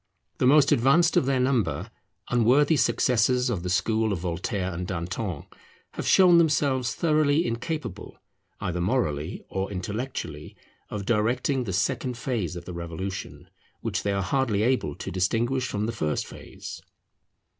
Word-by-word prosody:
The 125 - +3
most 145 +1 +6
advanced 145 +6 +4
of 130 - +3
their 135 -1 +2
number, 125 -3 0 0.4
unworthy 125 +6 +4
successors 125 -2 +2
of 100 -7 -2
the 90 - -4
school 110 +4 +1
of 100 - 0
Voltaire 90 +2 -3
and 90 +2 -4
Danton, 90 -1 -4 0.5
have - - -5
shown 180 -3 +7
themselves 140 -6 +1
thoroughly 155 -1 +2
incapable 120 +3 -4 0.4
either 90 -1 -2
morally 85 - -1
or 95 +1 -3
intellectually 95 - -5 0.3
of 100 -2 -5
directing 125 +4 +1
the 100 - -3
second 125 +6 -1
phase 115 -8 -2
of 85 -1 -7
the 90 - -7
Revolution, 85 +3 -6 0.3
which - - -2
they 100 - -1
are 100 -1 0
hardly 115 -3 +1
able 125 +2 +1
to - - -6
distinguish 115 +8 0
from 105 +1 -2
the 115 - -1
first 80 -10 -2
phase. - - -10
115 Hz, 145 wpm, -26 LUFS, 95-130 Hz, 0.5 s, shown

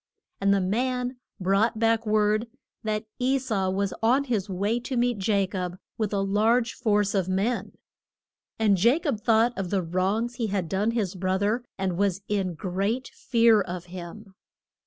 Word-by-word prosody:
And 200 0 +2
the 200 -1 +3
man 250 +6 -1 0.2
brought 200 +5 +2
back 225 0 +2
word 215 +1 +2 0.4
that 215 0 -2
E 260 +2 +2
sau 210 -8 -1
was 195 0 -1
on 250 +5 +3
his 220 -7 -2
way 200 +5 0
to 250 +1 -4
meet 235 -5 0
Ja 200 -3 +3
cob 185 -2 -4 0.2
with 215 -3 -2
a 200 -1 0
large 220 +4 +2
force 210 -4 +1
of 190 -3 0
men. 200 +6 -1 0.8
And 200 -4 +2
Ja 240 +6 +5
cob 290 - -2
thought 230 +2 +3
of 195 -4 -3
the 190 -1 0
wrongs 195 +8 -1
he 230 - -1
had 195 -4 -1
done 195 +5 0
his 220 -6 -1
broth 190 +1 -1
er, 225 +4 +1
and 190 -2 -2
was 200 -1 0
in 195 -4 -1
great 200 +9 -2
fear 230 -3 +3
of 180 -2 -5
him. 185 +3 -9
210 Hz, 175 wpm, -26 LUFS, 190-230 Hz, 0.8 s, Ja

